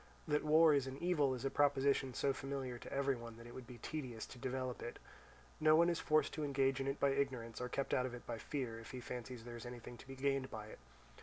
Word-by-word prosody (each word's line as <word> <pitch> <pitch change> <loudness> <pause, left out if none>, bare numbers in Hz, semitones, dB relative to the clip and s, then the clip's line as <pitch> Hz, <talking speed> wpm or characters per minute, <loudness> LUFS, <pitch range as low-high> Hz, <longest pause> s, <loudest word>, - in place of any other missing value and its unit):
That 150 -1 +2
war 155 +1 +7
is 140 -2 +2
an 130 +1 -5
evil 150 -6 +2
is 125 - -5
a 135 - +1
proposition 140 -2 +3
so 140 - +2
familiar 135 -2 -4
to - - -9
every 140 0 +2
one 115 -1 -8
that 115 - -11
it 120 - -10
would 130 -2 -8
be 125 - -9
tedious 125 -3 -4
to 125 - -12
develop 130 -1 -2
it. 120 - -5 0.6
No 155 0 +6
one 170 +2 +6
is 170 - -1
forced 155 -1 +3
to 155 - -2
engage 135 -1 +2
in 135 - -1
it 135 +1 -1
by 140 - +4
ignorance, 130 -5 -1
or 125 - -2
kept 140 +2 -1
out 125 0 +3
of 125 - -6
it 120 - -10
by 115 -1 -4
fear, 125 -5 -3
if 115 - -10
he 130 - -5
fancies 125 -1 -6
there 120 0 -7
is 115 - -8
anything 120 0 -8
to 130 - -13
be 135 - -7
gained 135 0 +1
by 110 -2 -6
it. - - -11
135 Hz, 260 wpm, -38 LUFS, 120-140 Hz, 0.6 s, war